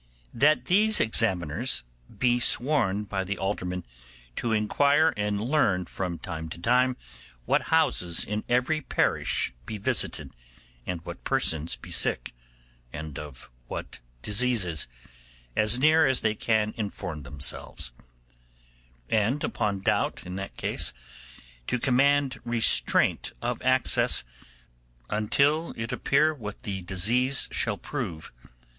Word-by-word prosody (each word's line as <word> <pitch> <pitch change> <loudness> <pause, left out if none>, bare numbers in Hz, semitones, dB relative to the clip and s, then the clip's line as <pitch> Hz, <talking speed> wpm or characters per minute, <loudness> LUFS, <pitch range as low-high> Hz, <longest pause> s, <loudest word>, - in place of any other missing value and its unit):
'That 150 +6 +3
these 215 +4 +3
examiners 95 -9 +1 0.3
be 120 -1 +3
sworn 120 -6 +2
by 95 -2 -3
the 100 +1 -3
aldermen 90 -2 -3 0.5
to 120 - -2
inquire 140 +9 +3
and 105 -1 -1
learn 110 -7 +1
from 90 -1 -4
time 80 0 -6
to - - -7
time 125 +7 +2 0.5
what - - +3
houses 140 - +2
in 105 +1 -3
every 125 +6 +2
parish 100 - 0
be 110 - -4
visited, 100 - -1 0.6
and 85 -2 -4
what - - -8
persons 80 0 0
be - - -12
sick, - - +1 0.6
and 75 -2 -6
of 75 -4 -10 0.2
what - - -6 0.2
diseases, 105 - +1 0.7
as 110 +2 +3
near 155 +3 +5
as 130 -1 +2
they 110 -1 +2
can 110 -1 0
inform 95 -7 -4
themselves; 70 -2 -3 1.1
and 110 - +1
upon 100 -2 -1
doubt - - 0
in 90 0 -6
that 95 +1 -6
case, - - -1 0.7
to - - 0
command 135 +1 +2
restraint 120 -2 +2
of - - -3
access - - +2 0.9
until 140 +10 +1
it 115 +2 -4
appear 150 +5 +2
what 110 -6 -8
the 100 -5 -4
disease 115 +9 +1
shall - - +1
prove. 80 -2 -5
110 Hz, 120 wpm, -27 LUFS, 90-130 Hz, 1.1 s, near